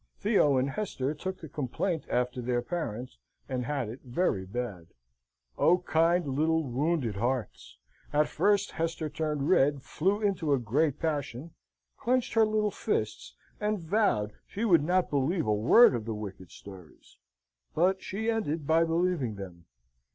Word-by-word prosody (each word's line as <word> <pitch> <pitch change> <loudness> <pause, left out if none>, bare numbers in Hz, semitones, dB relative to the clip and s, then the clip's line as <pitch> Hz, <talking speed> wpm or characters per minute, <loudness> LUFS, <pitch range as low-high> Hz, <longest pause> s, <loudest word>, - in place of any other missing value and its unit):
Theo 195 - +3
and 130 +2 +1
Hester 145 -7 -2
took 185 +5 -6
the 160 - -7
complaint 150 +5 -2
after 125 0 -1
their 120 0 -1
parents, 125 - -5 0.3
and 125 -2 -3
had 140 -5 -1
it 115 +5 -8
very 120 - -1
bad. 100 -6 -5 0.7
O 175 - +5
kind, 170 0 +2
little, 160 +4 +1
wounded 135 -4 -1
hearts! 120 - -3 0.3
At 150 +1 +3
first 205 -1 +1
Hester 165 -1 -2
turned 150 -2 -2
red, 140 -5 +3
flew 195 +6 0
into 190 -8 0
a 135 - +2
great 135 +6 +1
passion, 150 -1 -3 0.5
clenched 250 0 0
her 225 -1 +4
little 215 -1 +1
fists, 110 - -3 0.2
and 210 0 0
vowed 160 - +1
she 215 +4 -3
would 175 -8 +5
not 180 +3 +1
believe 150 +4 +1
a 105 - +2
word 120 - +6
of 115 -3 -3
the 115 -1 -3
wicked 95 -4 -8
stories; 95 -5 -14 0.6
but 185 +3 +2
she 220 +4 -4
ended 180 -10 -1
by 160 +2 +4
believing 165 -8 0
them. 90 -4 -9
150 Hz, 150 wpm, -29 LUFS, 120-180 Hz, 0.7 s, word